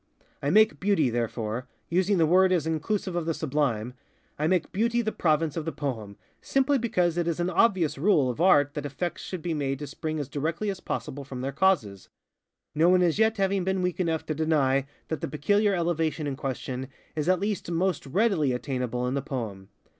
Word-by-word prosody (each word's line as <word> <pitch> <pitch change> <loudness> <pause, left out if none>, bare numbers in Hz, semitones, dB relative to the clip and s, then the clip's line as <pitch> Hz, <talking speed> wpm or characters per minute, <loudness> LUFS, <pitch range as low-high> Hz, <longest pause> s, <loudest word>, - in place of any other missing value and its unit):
I 140 - 0
make 215 +6 +4
Beauty, 185 -10 +2
thereforeŌĆöusing 120 - -1
the 165 - +4
word 185 +3 +4
as 175 -4 +2
inclusive 175 +4 -2
of 170 -2 -2
the 165 - +1
sublimeŌĆöI 130 -7 -1 0.6
make 180 -3 +1
Beauty 235 +4 +1
the 220 - -1
province 155 -4 +1
of 165 - -2
the 160 - -3
poem, 110 -10 -5 0.2
simply 270 +1 +2
because 180 -7 +1
it 170 - 0
is 170 0 -1
an 175 +1 0
obvious 180 -7 +2
rule 155 -5 +3
of 135 - -5
Art 145 -6 +5
that 150 -2 -4
effects 145 +5 -4
should 180 -4 -6
be 170 - -1
made 135 -3 -1
to 145 - -6
spring 155 +2 -4
as 145 - -3
directly 165 +9 -2
as 190 - -7
possible 140 -5 -4
from 130 -2 -7
their 135 +1 -2
causes:ŌĆöno 155 - -1
one 180 0 +5
as 175 +3 +1
yet 220 0 +3
having 195 -1 +1
been 190 0 0
weak 180 0 -1
enough 165 -3 0
to 155 - -2
deny 140 -4 +1 0.2
that 160 -4 -3
the - - -2
peculiar 200 +8 +2
elevation 165 -3 0
in 140 -2 -2
question 130 -2 -4 0.3
is 155 +2 -1
at 185 -1 +3
least 205 0 -2
_most 170 -3 0
readily 190 - +2
_attainable 125 -1 -2
in 125 - -1
the 140 - 0
poem. 110 -9 -5
160 Hz, 195 wpm, -27 LUFS, 135-185 Hz, 0.6 s, Art